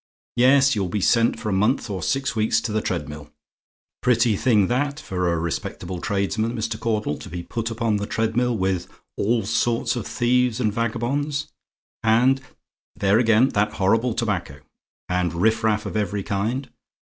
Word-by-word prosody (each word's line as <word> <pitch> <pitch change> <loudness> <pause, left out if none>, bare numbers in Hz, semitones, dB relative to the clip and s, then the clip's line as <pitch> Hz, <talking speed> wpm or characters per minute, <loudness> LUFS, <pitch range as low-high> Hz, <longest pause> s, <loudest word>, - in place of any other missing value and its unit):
Yes, 135 +2 +5
you'll 95 -3 -1
be 105 - -1
sent 115 +4 +2
for 110 - -3
a - - 0
month 105 +9 +1
or 95 -4 -4
six 135 - -1
weeks 110 +1 +2
to 115 - -3
the 110 0 0
treadmill. 75 -5 -5 0.7
Pretty 120 -3 +3
thing 110 -2 +3
that, 140 +6 -1
for 90 - -1
a 85 - 0
respectable 85 +2 -4
tradesman, 110 +4 -1
Mr. 110 -1 -3
Caudle, 105 -9 -1
to - - -9
be 85 +1 -5
put 115 +4 -4
upon 115 -2 0
the 100 0 -4
treadmill 115 +2 0
with 95 -2 -1 0.3
all 110 0 0
sorts 115 +3 0
of 120 - -4
thieves 125 -1 +1
and 110 -4 +1
vagabonds, 140 +6 -2 0.5
and 125 +4 +3 0.5
there, 100 +2 +3
again, 115 +2 +4
that 105 -3 0
horrible 110 +5 +1
tobacco! 90 - -2 0.5
and 90 -1 -1
riffraff 110 +2 +1
of 100 - -5
every 105 -1 -1
kind. 110 +8 -2
110 Hz, 160 wpm, -23 LUFS, 100-120 Hz, 0.7 s, Yes